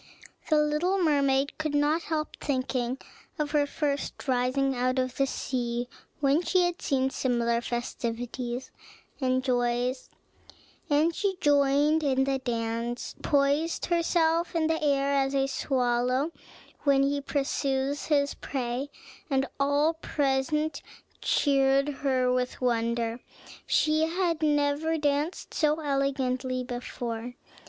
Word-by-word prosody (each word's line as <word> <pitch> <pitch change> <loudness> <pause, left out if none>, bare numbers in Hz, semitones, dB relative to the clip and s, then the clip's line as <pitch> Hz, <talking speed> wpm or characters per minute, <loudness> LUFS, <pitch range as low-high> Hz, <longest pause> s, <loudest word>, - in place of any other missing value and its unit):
The 310 - +4
little 300 +6 +2
mermaid 280 -5 +2
could 305 -2 -1
not 295 +3 +2
help 310 -2 -2
thinking 255 -2 -1 0.4
of 300 -2 -2
her 290 -1 +2
first 285 -1 -3
rising 260 +1 +1
out 255 +1 0
of 255 -1 -1
the 275 - +2
sea, 240 -2 -2 0.3
when 280 +3 +3
she 370 +1 +2
had 350 0 -1
seen 265 -1 +1
similar 235 -3 0
festivities 240 +1 -4 0.5
and 255 -1 +1
joys; 245 0 0 0.8
and 305 +3 +3
she 390 +2 -1
joined 290 +1 +3
in 265 -2 +2
the 270 0 0
dance, 235 -1 -3
poised 285 +3 +1
herself 335 0 +1
in 325 -1 +2
the 320 0 0
air 280 -1 +2
as 275 0 +1
a 270 0 +3
swallow 255 +1 0 0.5
when 275 -1 +3
he 285 +1 0
pursues 275 0 -1
his 285 -2 +2
prey, 255 +1 -3 0.4
and 270 -1 +2
all 285 +3 +3
present 300 0 -1 0.4
cheered 275 0 +3
her 255 -2 +2
with 250 0 -1
wonder. 235 -1 0 0.5
She 310 +1 +3
had 335 -1 0
never 295 +1 +1
danced 295 +3 -1
so 305 0 +2
elegantly 265 -3 -1
before. 245 -1 -5
275 Hz, 120 wpm, -28 LUFS, 255-300 Hz, 0.8 s, The